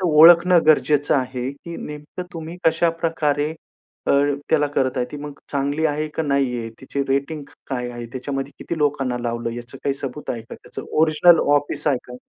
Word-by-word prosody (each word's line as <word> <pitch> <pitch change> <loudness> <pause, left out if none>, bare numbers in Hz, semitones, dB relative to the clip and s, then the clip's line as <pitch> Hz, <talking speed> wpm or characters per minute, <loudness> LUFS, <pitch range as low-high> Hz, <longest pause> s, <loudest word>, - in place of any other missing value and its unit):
तर - - -2
ओळखणं 170 +3 +7
गरजेचं 150 -1 +4
आहे, 130 -1 -1
की 170 +4 -9
नेमकं 150 +4 -7
तुम्ही 165 +1 -7
कशाप्रकारे, 165 -3 +1 0.6
अ, - - +3 0.4
त्याला 150 -2 +4
करत 130 -1 +1
आहे 125 - 0
ती - - -4
मग 145 0 -7 0.2
चांगली 145 +3 0
आहे 155 0 -1
का - - 0
नाहीये, 135 -5 0
त्याची 140 +1 -3
रेटिंग 140 +3 -1 0.3
काय 125 -2 -2
आहे? 120 -1 -7
त्याच्यामध्ये 135 +1 -4
किती 165 - -4
लोकांना 140 -4 0
लावलं 115 0 -2
याचं 120 +2 -9
काही 140 - +1
सबूत 140 +2 -6
आहे 115 -2 -4
का? 115 - -10
त्याचं - - -9
ओरिजिनल 160 +2 +6 0.2
ऑफिस 145 +1 -3
आहे 140 - +3
का? 125 - -8
145 Hz, 175 wpm, -22 LUFS, 130-155 Hz, 0.6 s, ओळखणं